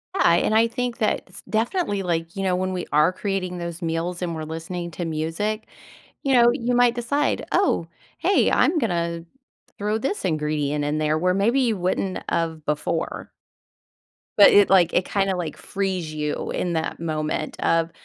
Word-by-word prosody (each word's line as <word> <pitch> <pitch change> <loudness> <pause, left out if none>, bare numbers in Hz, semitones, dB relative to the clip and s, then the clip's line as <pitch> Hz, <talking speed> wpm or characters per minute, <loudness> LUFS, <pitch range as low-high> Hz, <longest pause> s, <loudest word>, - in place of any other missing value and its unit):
Yeah, 170 - +4
and 175 +5 +2
I 225 +1 +5
think 245 0 -3
that 215 - 0
s - - -11
definitely, 220 - 0
like, 165 -1 -2
you 195 - -3
know, 185 -1 +1
when 185 0 -1
we 180 - -3
are 150 +4 +4
creating 185 -2 -3
those 170 0 -6
meals 170 +2 -2
and 170 -2 -2
we're 155 - -5
listening 165 +2 -5
to 170 +2 -4
music, 165 +8 -2 0.6
you 275 -1 +1
know, 240 -1 +6
you 245 +1 -1
might 245 0 +4
decide, 280 +5 0
"Oh, 170 - +2 0.3
hey, 390 +2 +3
I'm 335 - +3
gonna 170 - -1 0.5
throw 210 +2 -1
this 275 - -3
ingredient 150 -3 -1
in 150 +1 -1
there," 155 0 +1
where 180 +2 +2
maybe 230 +8 +2
you 230 -4 +1
wouldn't 185 +1 -1
of 160 -2 -2
before. 150 +2 -2 1.1
But 205 - +9
it, 205 -1 +6
like 180 -3 +5
it 180 - +2
kinda, 195 -2 0
like, 170 -4 -4
frees 190 -5 -3
you 150 -1 -3
in 175 -1 -2
that 160 0 -2
moment 155 -1 -3
of, 165 0 +1
180 Hz, 175 wpm, -23 LUFS, 165-210 Hz, 1.1 s, But